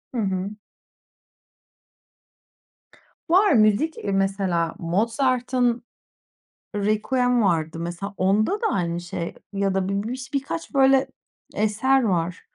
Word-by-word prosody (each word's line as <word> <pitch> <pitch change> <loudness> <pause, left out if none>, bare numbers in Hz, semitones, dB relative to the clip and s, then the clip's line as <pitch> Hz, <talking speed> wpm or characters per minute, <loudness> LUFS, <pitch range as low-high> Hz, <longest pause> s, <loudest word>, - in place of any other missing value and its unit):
Hı - - -1
hı. 190 -1 -2 2.8
Var, 380 +4 +5
müzik, 220 +7 +3
eee, 200 - -3
mesela, 195 -4 0
Mozart'ın 240 +5 0 0.9
“Requiem” 240 +4 +1
vardı. 165 -3 0
Mesela, 175 +4 -5
onda 195 +3 +2
da 455 - +2
aynı 170 -1 -1
şey 175 -1 -5 0.2
ya 195 -1 0
da 190 0 -1
bir 200 0 -1
biş 260 +3 -6
birkaç, 280 +5 -3
böyle, 270 -1 +4 0.5
eser 235 +6 +2
var. 180 -5 -1
205 Hz, 105 wpm, -23 LUFS, 185-255 Hz, 2.8 s, Var